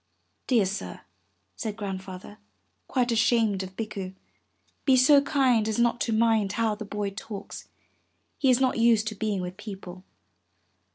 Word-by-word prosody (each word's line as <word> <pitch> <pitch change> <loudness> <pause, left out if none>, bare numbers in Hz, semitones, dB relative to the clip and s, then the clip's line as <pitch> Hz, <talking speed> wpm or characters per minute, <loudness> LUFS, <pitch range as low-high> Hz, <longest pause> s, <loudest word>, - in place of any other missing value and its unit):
'*Dear 235 -6 +3
sir," 195 +2 -5 0.5
said 220 -3 -4
Grandfather, 195 0 -7 0.5
quite 250 -2 0
ashamed 225 -3 +2
of 190 0 -8
Bikku, 195 -4 -5 0.7
''be 265 -2 +4
so 280 +3 +6
kind 255 -6 +2
as 220 - -1
not 235 0 +2
to 230 - 0
mind 220 -3 +2
how 225 -1 +1
the 215 +1 -7
boy 205 0 -3
talks; 200 0 -8 0.7
he 270 - +3
is 250 0 +5
not 260 -2 +1
used 230 -2 +4
to - - -7
being 205 -2 -2
with 180 +1 -6
people." 190 -3 -9
215 Hz, 150 wpm, -26 LUFS, 195-235 Hz, 0.7 s, so